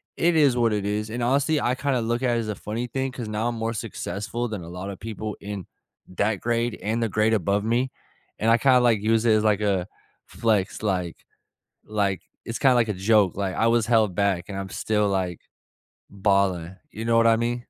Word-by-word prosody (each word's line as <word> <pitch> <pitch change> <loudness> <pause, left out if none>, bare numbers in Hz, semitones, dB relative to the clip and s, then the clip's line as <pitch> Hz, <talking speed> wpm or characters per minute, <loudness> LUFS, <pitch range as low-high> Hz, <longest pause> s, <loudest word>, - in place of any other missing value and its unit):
it 170 0 +2
is 140 -5 +4
what 115 -2 +2
it 100 -1 -1
is, 105 +1 -2
and 120 +2 -4
honestly, 140 +5 +2
I 125 -1 0
kinda 135 -2 0
look 120 +3 -1
at 120 -2 +2
it - - +1
as 110 - -3
a 105 - -2
funny 115 +4 -4
thing 135 +2 -2
'cause 120 -4 -6
now 110 +3 -1
I'm 120 - -4
more 115 +1 -2
successful 115 +1 -4
than 105 -6 -5
a 85 - -9
lotta 95 +2 -6
people 110 0 -5
in 100 -3 -6 0.4
that 100 +2 -1
grade 120 0 -1
and 115 +2 -1
the 110 - 0
grade 110 +2 +2
above 100 +1 +1
me, 125 +3 +1 0.5
and 110 - +1
I 115 - +6
kinda, 130 +1 +5
like, 115 -4 +3
use 110 +1 +2
it 110 - +5
as, 110 0 +3
like, 105 -2 +3
a 95 -3 0 0.4
flex, 105 -4 0
like, 90 -4 -1 0.7
like, 100 -4 -1 0.2
it's 115 - -4
kinda 130 -2 +5
like 115 -2 +2
a - - +1
joke. 100 0 +3
Like, 95 -2 -2
I 115 - +2
was 115 -1 +3
held 110 -6 +3
back, 100 -2 0
and 95 - -5
I'm 95 -1 -5
still, 105 +1 0
like, 95 -3 -1 0.7
balling, 95 -3 0 0.2
you 110 - -6
know 115 0 +2
what 115 0 +5
I 115 0 +5
mean? 120 +1 -1
110 Hz, 220 wpm, -24 LUFS, 100-120 Hz, 0.7 s, I